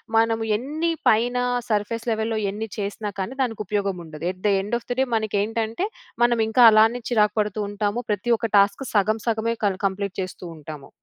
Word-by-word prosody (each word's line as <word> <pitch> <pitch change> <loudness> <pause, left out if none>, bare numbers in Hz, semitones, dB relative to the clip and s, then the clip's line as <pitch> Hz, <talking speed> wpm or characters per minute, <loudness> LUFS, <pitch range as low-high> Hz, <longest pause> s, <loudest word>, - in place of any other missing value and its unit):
మనము 225 0 +3
ఎన్ని 305 +8 -1 0.2
పైన 240 +3 +2 0.3
సర్ఫేస్ 220 +2 -1
లెవెల్‌లో 220 0 -1
ఎన్ని 215 +3 -4
చేసినా 205 +1 -3
కానీ 195 +7 -3
దానికి 225 -5 -1
ఉపయోగం 200 -1 -1
ఉండదు. 155 -1 -10
At 185 - -16
the - - +4
end 210 +4 -2
of - - -24
the - - 0
day 265 - +4
మనకి 215 -2 -1
ఏంటంటే 225 - -2 0.4
మనం 240 -1 +3
ఇంకా 230 +3 +4
అలానే 225 +3 +4
చిరాకు 210 -3 +2
పడుతూ 210 0 -3
ఉంటాము. 205 +3 -1
ప్రతి 210 +4 -1
ఒక్క 230 0 -3
టాస్క్ 200 +6 +3
సగం 215 +2 +2
సగమే 230 +1 0
క 200 - +3
కంప్లీట్ 195 0 -4
చేస్తూ 185 -1 -7
ఉంటాము. 150 -2 -10
215 Hz, 185 wpm, -23 LUFS, 200-230 Hz, 0.4 s, the